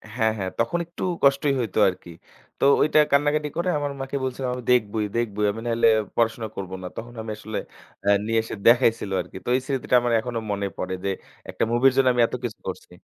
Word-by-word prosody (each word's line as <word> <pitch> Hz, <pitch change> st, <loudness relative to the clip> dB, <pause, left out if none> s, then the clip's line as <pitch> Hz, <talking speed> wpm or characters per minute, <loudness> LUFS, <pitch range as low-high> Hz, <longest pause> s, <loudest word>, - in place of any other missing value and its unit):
হ্যাঁ, 110 Hz, -3 st, +2 dB
হ্যাঁ। 95 Hz, -2 st, -2 dB
তখন 115 Hz, +9 st, +1 dB
একটু 170 Hz, -, -8 dB, 0.2 s
কষ্টই 140 Hz, +1 st, +4 dB
হইতো 110 Hz, -4 st, -1 dB
আরকি। 90 Hz, -1 st, -9 dB, 0.5 s
তো -, -, -2 dB, 0.2 s
ঐটা 155 Hz, 0 st, +4 dB
কান্নাকাটি 145 Hz, +1 st, +2 dB
করে 175 Hz, +2 st, 0 dB
আমার 145 Hz, -1 st, -2 dB
মাকে 135 Hz, +1 st, -5 dB
বলছিলাম, 130 Hz, 0 st, -2 dB
"আমি 125 Hz, -, -7 dB
দেখবোই, 110 Hz, -3 st, +2 dB
দেখবোই। 105 Hz, -3 st, 0 dB
আমি 110 Hz, +2 st, -7 dB
নাহলে 115 Hz, -1 st, +3 dB, 0.3 s
পড়াশোনা 115 Hz, -1 st, 0 dB
করব 95 Hz, -1 st, -6 dB
না।" -, -, -4 dB
তখন 120 Hz, +1 st, -7 dB
আমি 110 Hz, -, -5 dB
আসলে 110 Hz, 0 st, -6 dB, 0.5 s
অ্যা 100 Hz, -, +3 dB
নিয়ে 115 Hz, +1 st, +2 dB
এসে 115 Hz, -, -6 dB
দেখাইছিল 115 Hz, -4 st, +4 dB
আরকি। -, -, -10 dB
তো -, -, -3 dB
এই 130 Hz, -, +1 dB
স্মৃতিটা 135 Hz, -2 st, 0 dB
আমার 120 Hz, 0 st, 0 dB
এখনো 120 Hz, 0 st, -3 dB
মনে 100 Hz, 0 st, -1 dB
পড়ে 95 Hz, 0 st, -3 dB
যে, 100 Hz, -, 0 dB, 0.4 s
একটা -, -, -2 dB
মুভির 130 Hz, +3 st, +5 dB
জন্য 135 Hz, -1 st, +4 dB
আমি 120 Hz, -, +2 dB
এতকিছু 120 Hz, -3 st, -5 dB
করছি। 95 Hz, -1 st, -6 dB
120 Hz, 200 wpm, -24 LUFS, 110-135 Hz, 0.5 s, মুভির